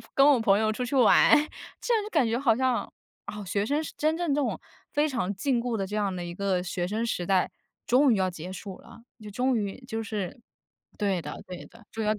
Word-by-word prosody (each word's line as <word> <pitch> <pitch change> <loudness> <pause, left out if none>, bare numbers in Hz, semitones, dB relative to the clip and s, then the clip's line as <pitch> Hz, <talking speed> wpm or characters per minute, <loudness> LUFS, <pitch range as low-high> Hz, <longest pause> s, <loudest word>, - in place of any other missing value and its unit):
我 - - -14
跟 275 +1 +6
我 260 -5 +4
朋 200 -3 +4
友 215 0 +1
出 250 - -4
去 250 +3 -2
玩， 245 -5 +6 0.5
这 485 - -1
样 440 - +2
就 415 - -6
感 300 - +3
觉 230 +1 0
好 230 -5 +3
像， 260 -1 0 0.4
哦， 210 -1 -6
学 200 +2 -1
生 295 +5 0
是 - - -7
真 310 +1 +1
正 335 -5 0
这 295 - +1
种 275 - -1 0.4
非 295 +1 +3
常 235 -9 -1
禁 245 +4 0
锢 240 -2 -1
的 195 - -2
这 205 - -7
样 205 -3 0
的 175 - -4
一 175 0 -6
个 190 -2 0
学 180 -1 -2
生 220 +4 -1
时 180 -6 -2
代， 190 -2 +2 0.4
终 265 +4 +5
于 - - +1
要 190 -1 +1
结 175 +1 -8
束 190 0 -8
了， - - -15 0.3
终 250 +5 +1
于， 200 -2 -3
就 225 -3 -3
是 210 0 -4 0.6
对 195 -4 0
的 - - -6
对 180 -1 -8
的， 230 -1 -18
终 225 - -3
于 210 - -1
要 215 - +3
跟 210 - -8
220 Hz, 270 characters per minute, -27 LUFS, 195-260 Hz, 0.6 s, 跟